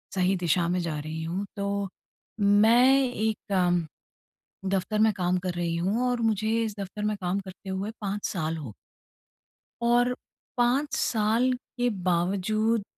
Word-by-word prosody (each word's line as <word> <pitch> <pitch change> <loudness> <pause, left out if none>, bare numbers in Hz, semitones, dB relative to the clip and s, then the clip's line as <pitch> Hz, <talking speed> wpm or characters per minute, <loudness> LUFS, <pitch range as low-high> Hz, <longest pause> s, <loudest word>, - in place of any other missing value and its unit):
सही 185 +1 +2
दिशा 175 -1 +1
में 180 0 +1
जा 160 -3 -3
रही 160 +2 -5
हूँ। 180 +5 -3
तो 200 0 -1 0.5
मैं 235 +7 +5
एक 220 -5 -2 1.1
दफ़्तर 195 +2 0
में 220 0 +5
काम 180 0 +1
कर 180 -1 -3
रही 170 -1 -1
हूँ 210 +8 0
और 245 -1 -1
मुझे 215 -1 +1
इस 215 -2 -3
दफ़्तर 200 +2 -5
में 210 - 0
काम 185 +2 0
करते 190 0 -10
हुए 190 +3 -3
5 205 0 -3
साल 165 -3 -2
हो 130 -9 -7 1.1
और 240 +1 +3 0.4
5 270 +4 +2
साल 225 +3 +2
के 245 -1 -2
बावजूद 200 +5 +1
200 Hz, 145 wpm, -27 LUFS, 180-225 Hz, 1.1 s, मैं